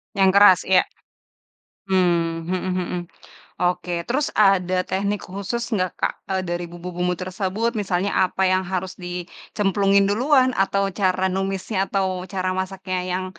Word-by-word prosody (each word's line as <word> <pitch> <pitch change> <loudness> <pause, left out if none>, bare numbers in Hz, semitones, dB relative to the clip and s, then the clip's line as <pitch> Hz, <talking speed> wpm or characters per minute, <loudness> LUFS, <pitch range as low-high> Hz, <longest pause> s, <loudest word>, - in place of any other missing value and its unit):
Yang 195 -1 +4
keras, 200 -3 +8
iya. 185 -1 +5 1.0
Hmm. 170 -3 +1
Mhm 185 - +1 0.2
mhm. 180 0 -3 0.6
Oke, 180 0 0 0.2
terus 280 +4 0
ada 195 -3 +3 0.2
teknik 200 +2 -1
khusus 200 +5 -4
enggak 185 -4 0
Kak, - - 0 0.2
eee, 190 -1 0
dari 175 0 -2
bumbu-bumbu 180 +1 -3
tersebut, 190 +5 -2
misalnya 190 +1 -1 0.2
apa 190 - -2
yang 185 0 +2
harus 185 0 -2
dicemplungin 195 +3 0
duluan, 260 +4 +3
atau 200 0 +1 0.2
cara 185 -1 +2
numisnya, 195 +2 -2
atau 195 -1 0 0.3
cara 185 -1 -1
masaknya 190 0 -4
yang 185 +1 -1
190 Hz, 135 wpm, -22 LUFS, 180-200 Hz, 1.0 s, keras